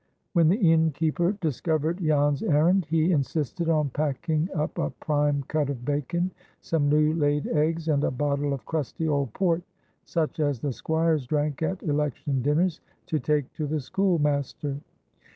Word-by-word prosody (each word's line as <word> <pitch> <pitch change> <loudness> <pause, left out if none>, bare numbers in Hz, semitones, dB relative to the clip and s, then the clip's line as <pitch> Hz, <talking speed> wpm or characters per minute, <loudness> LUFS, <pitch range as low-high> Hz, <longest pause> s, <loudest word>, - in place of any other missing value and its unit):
When 165 -4 +5
the 185 - +4
innkeeper 165 - +2
discovered 160 +2 0
Jan's 145 -4 +2
errand, 165 +4 +3
he 165 +2 +2
insisted 150 +2 -1
on 150 -4 +2
packing 155 +4 -1
up 150 -1 -2
a - - 0
prime 145 -2 0
cut 150 -2 0
of 125 -3 -5
bacon, 150 +5 -1 0.3
some 150 -3 0
new 150 +1 +3
laid 145 -2 +1
eggs, 160 +1 0
and 145 -2 +2
a - - +2
bottle 140 +2 -1
of 135 -5 -4
"crusty" 160 0 -2
old 140 -5 0
port, 175 -3 +1 0.4
such 160 -2 -2
as 145 -5 +1
the 140 +1 -2
squires 160 -1 0
drank 150 +1 -1
at 185 +3 -2
election 145 -3 -1
dinners, 155 +6 +1 0.2
to 155 - -1
take 150 -3 0
to 155 - -3
the 155 +1 -1
schoolmaster. 145 -4 0
150 Hz, 155 wpm, -26 LUFS, 145-165 Hz, 0.4 s, When